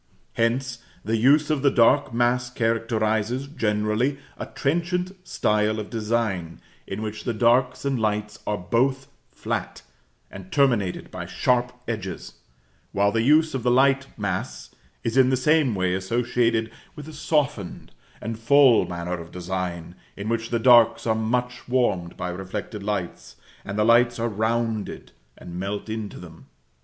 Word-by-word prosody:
Hence, 120 +2 0 0.3
the 110 - 0
use 145 +7 +4
of 150 -3 0
the 140 - +4
dark 130 +3 +4
mass 120 +1 +1
characterises, 115 +1 0
generally, 110 0 0 0.2
a - - -6
trenchant 175 +5 -1 0.2
style 105 +1 +1
of 105 - -7
design, 105 -7 -2 0.3
in 100 +3 -5
which 105 0 -5
the 120 - -2
darks 125 +4 +2
and 135 -3 0
lights 105 -1 -2
are 105 - 0
both 130 +8 0 0.2
flat, - - -4 0.5
and 95 -1 -11
terminated 120 -10 +1
by - - -6
sharp 125 0 +1 0.2
edges; - - -5 0.6
while 100 +1 +2
the 115 - +1
use 155 +5 +4
of 130 - -2
the 125 - +1
light 135 +2 +3
mass 90 - -4 0.3
is 115 +3 -1
in 130 -1 +6
the 130 - +2
same 145 -3 +2
way 90 -1 0
associated 115 +3 0 0.2
with 150 0 -9
a 155 - -9
softened 145 - -2 0.3
and 115 0 -5
full 130 0 +5
manner 85 0 -4
of 85 0 -10
design, 90 -2 -4 0.2
in 100 +2 -4
which 115 0 -1
the 120 - +1
darks 120 -1 +5
are 110 - +2
much 125 +3 -2
warmed 100 -9 0
by 90 - -3
reflected 95 +4 -6
lights, 100 -4 -4 0.3
and 100 +1 -5
the 105 - +3
lights 120 +1 +4
are 115 0 -1
rounded 110 0 -2 0.3
and 90 0 -8
melt 100 +3 -4
into 110 -2 -5
them. - - -13
115 Hz, 150 wpm, -24 LUFS, 105-125 Hz, 0.6 s, in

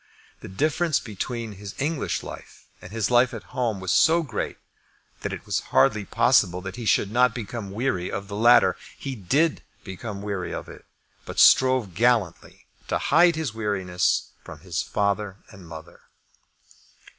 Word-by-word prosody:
The - - -10
difference 155 - 0
between 115 +1 -5
his 100 0 -9
English 150 +2 -2
life - - -11 0.2
and 90 - -11
his 115 0 -1
life 120 0 +4
at 110 - -11
home 115 -6 -1
was 95 -1 -2
so 165 +1 +4
great, 125 -8 -4 0.6
that - - -3
it - - -7
was - - 0
hardly 100 +11 +3
possible 100 -8 +3
that 95 0 -7
he 120 - -7
should 105 -1 +2
not 125 +1 +3
become 115 -2 -6
weary 100 -4 -2
of 100 0 -5
the 100 - -6
latter. 110 -4 +5 0.2
He 135 - -5
did 140 - +1 0.2
become 100 +1 -7
weary 100 -3 -4
of - - -7
it, - - -13 0.4
but - - -9
strove 130 -7 +5
gallantly 110 -4 0 0.2
to - - 0
hide 170 +3 +4
his 155 -7 -3
weariness 95 -5 -1
from - - -11
his - - -3
father 100 -1 -1
and 95 -4 -13
mother. 80 +1 -11
110 Hz, 160 wpm, -24 LUFS, 95-125 Hz, 0.6 s, latter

